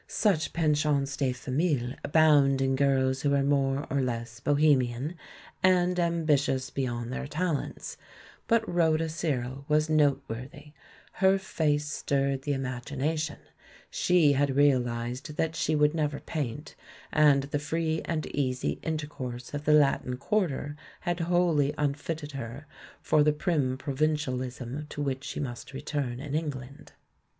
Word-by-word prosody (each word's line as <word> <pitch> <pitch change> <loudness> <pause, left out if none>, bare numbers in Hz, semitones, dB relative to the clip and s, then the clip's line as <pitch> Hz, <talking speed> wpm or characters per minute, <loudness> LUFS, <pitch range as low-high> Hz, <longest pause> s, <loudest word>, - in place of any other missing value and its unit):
Such 185 -8 +1
pensions 150 -3 +1
de 135 -1 0
famille 130 0 -1
abound 145 -3 +4
in 135 0 +1
girls 135 -1 +2
who 140 -1 +2
are 140 - +2
more 140 0 +1
or 140 0 +1
less 120 -2 -3
bohemian, 140 0 +2 0.5
and 180 -1 +3
ambitious 155 -6 +1
beyond 120 -2 -3
their 140 +1 -4
tal 160 +1 0
ents, - - -7 0.5
but 230 -1 +2
Rhoda 165 -2 +2
Searle 140 -5 -3
was 155 +1 +2
noteworthy 140 -1 -1 0.2
— - - -26
her 190 0 +5
face 150 -6 0
stirred 140 -1 -1
the 145 +1 -1
imagination, 140 +4 -2 0.5
she 170 -5 +4
had 140 -1 +1
realised 125 -1 +1
that 160 0 0
she 155 - 0
would 150 0 +3
never 150 -3 -1
paint, 145 -1 -5 0.4
and 145 -2 +5
the 145 +1 -2
free 160 +1 -1
and 160 -2 -2
easy 130 -3 -1
in 160 -1 -1
tercourse 130 -5 -6
of 145 0 -4
the 150 - +4
Latin 135 -4 +3
quarter 145 -2 -1 0.3
had 175 -1 -2
wholly 165 -4 +2
un 145 -1 +1
fitted 150 +1 -5
her 135 +1 -7 0.4
for 155 - +3
the 150 0 +4
prim 150 -5 0
provincialism 135 -2 -2
to - - -8
which 135 -2 -2
she - - -5
must 130 -1 -6
return 135 -3 -3
in 140 0 -6
England. 145 -2 -5
145 Hz, 140 wpm, -28 LUFS, 135-155 Hz, 0.5 s, her